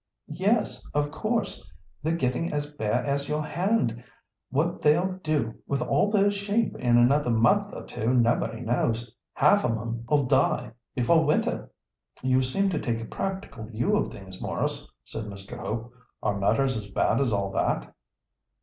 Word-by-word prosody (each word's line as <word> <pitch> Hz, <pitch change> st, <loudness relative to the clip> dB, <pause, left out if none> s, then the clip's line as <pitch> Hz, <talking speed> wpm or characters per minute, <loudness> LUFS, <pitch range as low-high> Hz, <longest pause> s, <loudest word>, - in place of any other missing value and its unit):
"Yes, 205 Hz, +7 st, +1 dB
of 145 Hz, 0 st, +1 dB
course; 215 Hz, -, -2 dB, 0.3 s
they're 160 Hz, +2 st, 0 dB
getting 130 Hz, +2 st, 0 dB
as 145 Hz, 0 st, -2 dB
bare 110 Hz, -7 st, -1 dB
as 140 Hz, 0 st, -1 dB
your 150 Hz, 0 st, -1 dB
hand. 175 Hz, -, 0 dB, 0.5 s
What 160 Hz, +6 st, 0 dB
they'll 180 Hz, +5 st, +2 dB
do 145 Hz, -8 st, 0 dB
with 140 Hz, -, 0 dB
all 205 Hz, -, +2 dB
those 205 Hz, -1 st, +3 dB
sheep 205 Hz, +3 st, 0 dB
in 120 Hz, -1 st, +3 dB
another 125 Hz, +3 st, +4 dB
month 115 Hz, +1 st, +3 dB
or -, -, -7 dB
two 115 Hz, +3 st, -2 dB
nobody 115 Hz, -2 st, +2 dB
knows. 115 Hz, -1 st, -1 dB, 0.2 s
Half 150 Hz, +8 st, +5 dB
of 115 Hz, -, +1 dB
'em'll 120 Hz, +5 st, 0 dB
die 130 Hz, +2 st, +2 dB, 0.2 s
before 160 Hz, +7 st, +4 dB
winter." 150 Hz, 0 st, 0 dB, 0.5 s
"You 130 Hz, 0 st, +3 dB
seem 190 Hz, +10 st, +1 dB
to 160 Hz, -, 0 dB
take 115 Hz, -2 st, -1 dB
a 115 Hz, -, -5 dB
practical 190 Hz, -, -4 dB
view 120 Hz, -, 0 dB
of 210 Hz, -, 0 dB
things, 95 Hz, -1 st, -10 dB
Maurice," -, -, -2 dB
said 110 Hz, -, -6 dB
Mr. 100 Hz, -1 st, -8 dB
Hope. 115 Hz, +2 st, -4 dB, 0.3 s
"Are 100 Hz, -, +1 dB
matters 115 Hz, +7 st, +2 dB
as 105 Hz, -2 st, -5 dB
bad 110 Hz, +5 st, +2 dB
as 130 Hz, -4 st, +1 dB
all 100 Hz, -2 st, 0 dB
that?" -, -, -1 dB
130 Hz, 160 wpm, -27 LUFS, 115-165 Hz, 0.5 s, Half